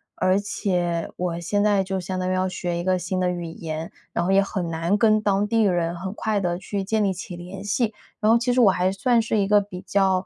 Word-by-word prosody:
而 185 +2 +2
且 175 -4 -1
我 175 -1 -2
现 205 +4 0
在 205 -2 +3
就 190 0 -2
相 185 +1 -4
当 185 - -1
于 - - +1
要 185 0 0
学 175 -1 -3
一 - - -3
个 185 0 +2
新 180 +1 -2
的 180 -1 +1
语 175 -1 -3
言， 160 -1 -6 0.2
然 170 - 0
后 190 - +1
也 195 0 +5
很 190 -3 -3
难 165 +5 0
跟 215 -1 +4
当 200 0 +1
地 225 +1 +2
人 175 -3 +1
很 185 +2 -5
快 215 -2 0
地 175 -2 -1
去 195 +2 -4
建 215 +2 0
立 195 -2 +1
起 180 0 -7
联 180 +3 -8
系。 215 +2 0 0.3
然 215 +1 +3
后 230 - +6
其 245 +1 0
实 250 - +2
我 205 -5 +7
还 185 0 +1
算 230 +5 +2
是 220 0 -1
一 200 -2 +2
个 205 0 +5
比 185 -2 -8
较 190 -1 +1
190 Hz, 275 characters per minute, -24 LUFS, 180-205 Hz, 0.3 s, 我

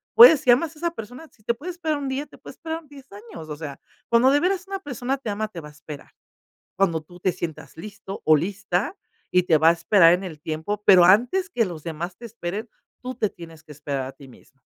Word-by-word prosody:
Puedes 450 - +10
si 255 - -2
amas 310 +6 +2
esa 340 +2 -2
persona, 250 +3 -9
si 210 - -28
te 235 - +1
puede 315 +10 -7
esperar 320 -4 -2
un 280 -1 -4
día, 265 +2 -3
te 280 - -18
puede - - -12
esperar 325 -1 -6
10 275 -3 -15
años, 200 -7 -11
o 150 - -4
sea, 150 -3 -8 0.3
cuando 240 +3 +5
de 290 - +4
veras 365 +2 0
una 390 0 -4
persona 270 -4 -3
te 260 - -6
ama 215 +1 -3
te 175 - -8
va 150 - -10
a - - -15
esperar. 150 -1 -11 0.7
Cuando 170 -5 +2
tú 175 +3 -16
te 185 - +1
sientas 160 -3 -7
listo 200 +1 -9
o 155 - +6
lista 195 - -2 0.4
y 180 - +4
te 160 -3 +4
va 160 +2 +5
a - - +7
esperar 170 -1 +5
en 180 +2 -1
el 160 -5 -8
tiempo, 160 +7 -4
pero 180 -3 +8
antes 245 - +3
que 235 -10 +1
los 170 -5 -7
demás 170 +2 -5
te 235 - -10
esperen, 215 0 -6 0.3
tú 255 0 -6
te 215 -3 0
tienes 165 -2 -13
que 155 - -15
esperar 140 -2 -4
a - - -8
ti 140 - -15
mismo. 130 +1 -20
205 Hz, 240 wpm, -23 LUFS, 165-270 Hz, 0.7 s, Puedes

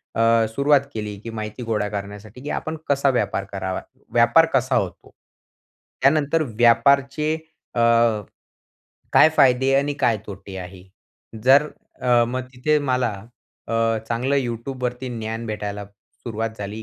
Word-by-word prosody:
अ, 115 0 +4
सुरुवात 140 +3 +3
केली, 105 -2 -4
की 115 - -8
माहिती 110 +2 -6
गोळा 105 -2 -1
करण्यासाठी 105 +3 -7
की 145 - -6
आपण 160 0 -3
कसा 140 0 +3
व्यापार 105 -5 -1
करावा? 95 -1 -3 0.3
व्यापार 120 +8 +5
कसा 130 0 +2
होतो? 95 -3 -3 0.9
त्यानंतर 150 +3 +3
व्यापारचे 140 +6 +3 0.4
अ, - - 0 1.3
काय - - +7
फायदे 135 -1 +4
आणि 140 +1 +1
काय 115 -3 +3
तोटे 95 -1 -9
आहे? 90 0 -9 0.6
जर 140 +3 +6 0.4
अ, 120 -2 +4
मग 130 +1 -3
तिथे 150 +4 +2
मला 125 -1 +1 0.6
अ, - - -3 0.4
चांगलं 125 +4 0
Youtubeवरती 125 0 -3
ज्ञान 115 +1 -4
भेटायला 105 -1 -4
सुरुवात 110 +2 -7
झाली. 105 +2 -6
120 Hz, 130 wpm, -22 LUFS, 105-135 Hz, 1.3 s, काय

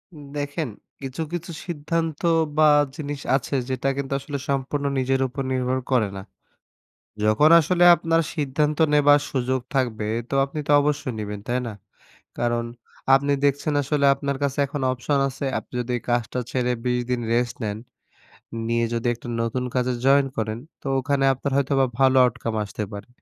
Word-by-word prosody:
উম 150 - -11
দেখেন 145 +1 -3 0.3
কিছু, 135 +3 -5
কিছু 175 0 -4
সিদ্ধান্ত 165 -1 -2 0.4
বা, 155 -1 +6 0.3
জিনিস 145 -3 -5 0.2
আছে, 140 +1 -2
যেটা 130 +1 -1
কিন্তু 140 -1 -3
আসলে 140 +1 -5
সম্পূর্ণ 140 +1 -1
নিজের 135 +1 +1
উপর 135 +2 -5
নির্ভর 130 0 0
করে 120 -5 +3
না। - - -6 1.0
যখন 110 +9 +5
আসলে 175 +3 +2
আপনার 165 0 +1
সিদ্ধান্ত 150 0 0 0.2
নেবার 145 0 +6
সুযোগ 130 -1 0
থাকবে, 115 -5 0 0.2
তো - - -3
আপনি 140 +3 -7
তো - - +4
অবশ্যই 145 -4 -1
নিবেন, 105 -1 -5
তাই 125 0 0
না? 115 - -4 0.7
কারণ, 120 -1 0 0.5
আপনি 140 +1 +1
দেখছেন 145 +2 +1
আসলে 140 0 +1
আপনার 140 -1 -3
কাছে 140 0 -1
এখন 140 0 -5
অপশন 135 +3 0
আছে। 140 +2 -5
আপনি - - -20
যদি 125 +1 -3 0.2
কাজটা 120 +1 0
ছেড়ে 125 -1 0
২০ 125 0 +1
দিন 125 -1 0
রেস্ট 120 0 0
নেন। 105 0 -2 0.9
নিয়ে 115 0 +1
যদি 115 +1 -1
একটা 120 - -11
নতুন 120 +2 -1
কাজে 125 0 +1
জয়েন 135 0 +5
করেন, 110 0 -2 0.2
তো - - -7
ওখানে 140 +1 0
আপনার 135 +2 -4
হয়তো 140 0 +1 0.3
ভালো 135 0 +5
আউটকাম 120 -2 -1
আসতে 105 +1 -5
পারে। 100 - -8
135 Hz, 165 wpm, -23 LUFS, 125-145 Hz, 1.0 s, বা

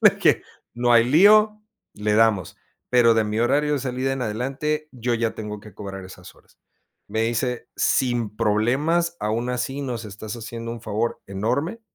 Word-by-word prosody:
le - - +9
dije: - - +3 0.3
"No 120 0 +2
hay 115 0 +6
lío, 210 - +5 0.3
le 105 0 0
damos, 110 -5 +2 0.3
pero 120 -2 +5
de 110 -1 +2
mi 105 +2 -2
horario 145 +5 +2
de 145 - +1
salida 130 +1 -2
en 135 -1 -3
adelante 135 +7 -2
yo 120 -1 -1
ya 115 -1 -1
tengo 105 -1 -6
que 105 -2 -14
cobrar 95 -2 -7
esas 90 0 -12
horas". - - -25 0.5
Me 110 +2 -1
dice: 120 +2 -1
"Sin 120 -5 +1
problemas, 135 +11 +1
aún 115 +4 -1
así 125 +3 -3
nos 120 -4 -4
estás 105 +2 -7
haciendo 115 0 -6
un 115 - -8
favor 110 +1 -2
enorme". 120 - -2
120 Hz, 170 wpm, -23 LUFS, 110-135 Hz, 0.5 s, le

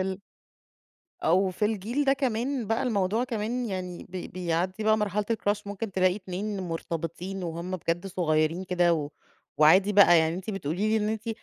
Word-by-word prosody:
ال 190 +1 -3 1.0
أو 185 +4 +3
في 185 +3 -2
الجيل 225 +7 -1
ده 270 - +4
كمان، 255 -1 -1
بقى 225 +2 0
الموضوع 215 0 +1
كمان 240 +1 -2
يعني 185 -3 -5
بي 180 0 -6
بيعدِّي 180 +3 -2
بقى 215 0 +4
مرحلة 210 0 0
الCrush 205 -2 -1
ممكن 200 +1 -5
تلاقي 185 0 +2
اتنين 200 +1 -4
مُرتبطين 170 +2 -4
وهُم 170 +1 -5
بجد 175 +2 -2
صُغيَّرين 165 -1 0
كده، 175 -2 +2
و 150 -3 -3 0.5
وعادي 185 +7 +6
بقى، 190 -4 +7
يعني 160 0 +2
أنتِ 190 +4 -5
بتقولي 195 +1 -2
لي 220 - +2
إن - - 0
أنتِ 220 +1 -3
190 Hz, 170 wpm, -27 LUFS, 175-215 Hz, 1.0 s, بقى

